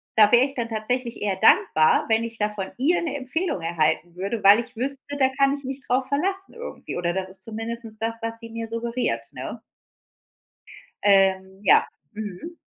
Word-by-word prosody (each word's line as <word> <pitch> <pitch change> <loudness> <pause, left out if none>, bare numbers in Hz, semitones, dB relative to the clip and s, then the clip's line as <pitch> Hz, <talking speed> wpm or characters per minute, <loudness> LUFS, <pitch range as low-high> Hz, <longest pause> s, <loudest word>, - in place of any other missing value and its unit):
da 210 -1 +6
wäre 240 +2 +6
ich 275 - -6
dann 235 -4 -3
tatsächlich 235 +1 -2
eher 195 -2 0
dankbar, 155 -4 +4
wenn 225 0 +2
ich 230 -1 -6
da 210 0 0
von 195 -2 -4
ihr 305 +8 +2
'ne 320 -4 -3
Empfehlung 275 - -2
erhalten 165 +1 0
würde, 200 +4 -3
weil 200 +3 +8
ich 245 +1 -7
wüsste, 275 +4 -4
da 265 -2 +4
kann 275 0 +4
ich 285 - -10
mich 265 +1 -5
drauf 255 +1 +1
verlassen 380 +8 -1
irgendwie, 475 - -7
oder 175 0 -1
das 190 0 -3
ist 190 0 -5
zumindest 225 0 -6
das, 225 +1 -3
was 230 0 -4
sie 230 0 -10
mir 230 0 -5
suggeriert, 235 +2 -2
ne? - - -7 1.4
Ähm, 190 -1 +3
ja, - - +6 0.3
mhm. 215 - -7
230 Hz, 185 wpm, -24 LUFS, 200-260 Hz, 1.4 s, weil